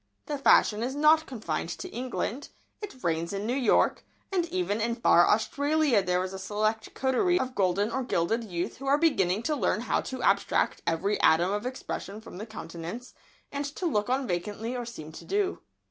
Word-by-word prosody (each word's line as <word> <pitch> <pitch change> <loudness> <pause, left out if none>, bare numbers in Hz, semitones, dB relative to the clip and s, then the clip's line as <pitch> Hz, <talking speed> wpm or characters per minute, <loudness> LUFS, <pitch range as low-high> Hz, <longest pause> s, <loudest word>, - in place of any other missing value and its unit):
The 290 -2 -3
fashion 215 -5 +4
is 255 +3 -2
not 310 +2 +4
confined 205 -10 -3
to - - -6
England. 255 +2 -4 0.3
It 320 -12 -8
reigns 170 +1 -1
in 200 +1 -3
New 240 - 0
York, 255 -6 +2 0.3
and 360 -3 +1
even 340 - -1
in 230 +1 0
far 175 -7 +5
Australia 285 +2 +2
there 180 0 0
is 185 +1 -5
a 190 - -6
select 215 +3 -2
coterie 355 +8 +2
of 260 0 -2
golden 200 +1 +1
or 265 - -1
gilded 225 +1 0
youth 175 -5 -4
who 275 - -7
are 280 +1 +4
beginning 210 - +2
to 305 +3 0
learn 240 -5 0
how 245 - 0
to 260 -1 -6
abstract 200 0 +2
every 195 +5 0
atom 170 +4 +4
of 210 +4 -2
expression 215 -5 -5
from 220 -4 -11
the 215 - -6
countenance, 190 +3 -7 0.4
and 280 0 -2
to 370 - -4
look 210 -9 0
on 265 +1 +1
vacantly 210 +5 -3
or 245 -1 -4
seem 160 -10 -8
to - - -10
do 400 -1 -1
so. - - -40
225 Hz, 195 wpm, -28 LUFS, 195-270 Hz, 0.4 s, far